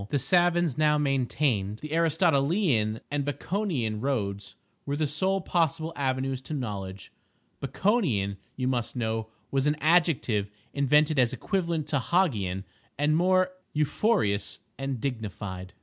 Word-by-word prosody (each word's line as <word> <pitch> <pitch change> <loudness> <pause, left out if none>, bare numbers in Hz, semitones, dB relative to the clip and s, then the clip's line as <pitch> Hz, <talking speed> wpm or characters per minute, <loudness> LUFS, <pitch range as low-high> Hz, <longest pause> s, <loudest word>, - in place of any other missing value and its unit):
The 145 - +1
savans 175 +1 +2
now 150 -1 +4
maintained 130 -7 0
the 150 +5 -7
Aristotelian 160 - +2
and 145 -1 0
Baconian 145 - -2
roads 100 -7 -2 0.3
were 140 - -2
the 155 +1 +1
sole 190 +7 +1
possible 165 -2 0
avenues 130 -1 -1
to 155 - -5
knowledge. 100 - -5 0.5
"Baconian," 135 - +1 0.2
you 130 -1 -1
must 125 -2 -1
know, 110 -2 -2 0.2
was 135 +1 +1
an 150 - +2
adjective 155 - +2 0.2
invented 150 +1 +3
as 125 0 +3
equivalent 170 0 -1
to 145 - +1
Hog 175 +3 +2
ian 95 -2 -3 0.3
and 150 +2 +2
more 185 +2 +3 0.2
euphonious 150 - +1
and 135 -2 -3
dignified. 100 -7 -5
140 Hz, 130 wpm, -27 LUFS, 110-165 Hz, 0.5 s, now